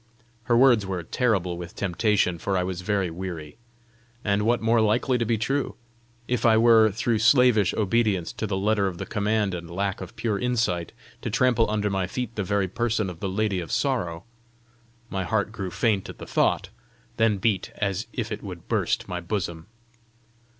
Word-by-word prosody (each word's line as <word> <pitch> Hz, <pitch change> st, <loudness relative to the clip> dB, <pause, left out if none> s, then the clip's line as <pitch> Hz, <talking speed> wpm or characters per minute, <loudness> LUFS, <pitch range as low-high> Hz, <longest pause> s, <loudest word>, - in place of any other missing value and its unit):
Her 120 Hz, 0 st, +3 dB
words 120 Hz, -4 st, +5 dB
were 95 Hz, -3 st, -3 dB
terrible 90 Hz, -4 st, 0 dB
with 85 Hz, 0 st, -8 dB
temptation, 95 Hz, -2 st, +1 dB
for 100 Hz, +1 st, -1 dB
I 90 Hz, -, +1 dB
was 90 Hz, -1 st, -4 dB
very 95 Hz, -2 st, 0 dB
weary. 85 Hz, -4 st, -6 dB, 0.7 s
And 100 Hz, 0 st, +2 dB
what 115 Hz, +3 st, +2 dB
more 115 Hz, 0 st, +3 dB
likely 115 Hz, +4 st, +2 dB
to 115 Hz, -, +1 dB
be 115 Hz, 0 st, +1 dB
true! 135 Hz, +6 st, -1 dB, 0.5 s
If 125 Hz, -1 st, -1 dB
I 115 Hz, -2 st, +5 dB
were, 115 Hz, -1 st, +6 dB
through 115 Hz, +2 st, 0 dB
slavish 120 Hz, -4 st, +5 dB
obedience 105 Hz, -4 st, +1 dB
to 110 Hz, -, -3 dB
the 95 Hz, -1 st, -1 dB
letter 100 Hz, 0 st, +1 dB
of 90 Hz, -2 st, -4 dB
the -, -, -5 dB
command 105 Hz, -2 st, 0 dB
and 85 Hz, -2 st, -6 dB
lack 95 Hz, +2 st, -2 dB
of 95 Hz, -, -8 dB
pure 105 Hz, -4 st, -1 dB
insight, 115 Hz, -9 st, 0 dB, 0.3 s
to -, -, -3 dB
trample 120 Hz, -3 st, +2 dB
under 105 Hz, -1 st, 0 dB
my 95 Hz, -2 st, 0 dB
feet 125 Hz, +4 st, -4 dB
the 105 Hz, -, -1 dB
very 100 Hz, 0 st, 0 dB
person 110 Hz, -1 st, -1 dB
of 85 Hz, -, -12 dB
the 95 Hz, -, -2 dB
Lady 100 Hz, 0 st, 0 dB
of 85 Hz, -, -6 dB
Sorrow! 90 Hz, -, -1 dB, 0.9 s
My 95 Hz, -1 st, -1 dB
heart 105 Hz, +2 st, 0 dB
grew 100 Hz, -4 st, -4 dB
faint 100 Hz, +2 st, 0 dB
at -, -, -9 dB
the -, -, -8 dB
thought, -, -, +1 dB, 0.5 s
then 110 Hz, -2 st, +3 dB
beat 100 Hz, -2 st, 0 dB
as 100 Hz, -3 st, -1 dB
if -, -, -4 dB
it -, -, -4 dB
would -, -, -9 dB
burst -, -, 0 dB
my 90 Hz, -1 st, -4 dB
bosom. 85 Hz, -3 st, -4 dB
105 Hz, 185 wpm, -25 LUFS, 90-115 Hz, 0.9 s, were